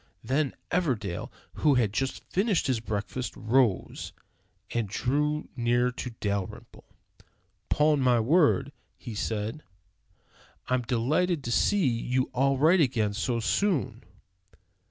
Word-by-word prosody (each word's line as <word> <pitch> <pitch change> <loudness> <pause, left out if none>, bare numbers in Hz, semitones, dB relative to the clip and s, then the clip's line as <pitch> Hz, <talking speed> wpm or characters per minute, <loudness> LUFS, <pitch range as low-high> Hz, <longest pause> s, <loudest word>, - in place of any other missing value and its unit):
Then 135 +4 0 0.2
Everdell, 125 - -1 0.2
who 145 -3 +3
had 110 -5 +1
just 135 +2 -2
finished 195 -3 +1
his 130 -4 +1
breakfast, 110 +3 -4
rose 115 -3 0 0.6
and 115 -4 -1
drew 150 +7 0
near 120 0 +2
to 125 0 -5
Dalrymple. 100 -2 -5 0.7
"'Pon 150 -1 +3
my 125 -3 +3
word," 140 +2 +3 0.3
he 120 - -8
said, 110 +6 -3 1.0
"I'm 130 0 +1
delighted 140 +8 0
to 120 - -3
see 195 - +2
you 125 +2 0
all 135 +2 +2
right 165 +6 +5
again 115 -7 +1
so 115 +4 -1
soon." 130 - 0
125 Hz, 115 wpm, -28 LUFS, 115-150 Hz, 1.0 s, right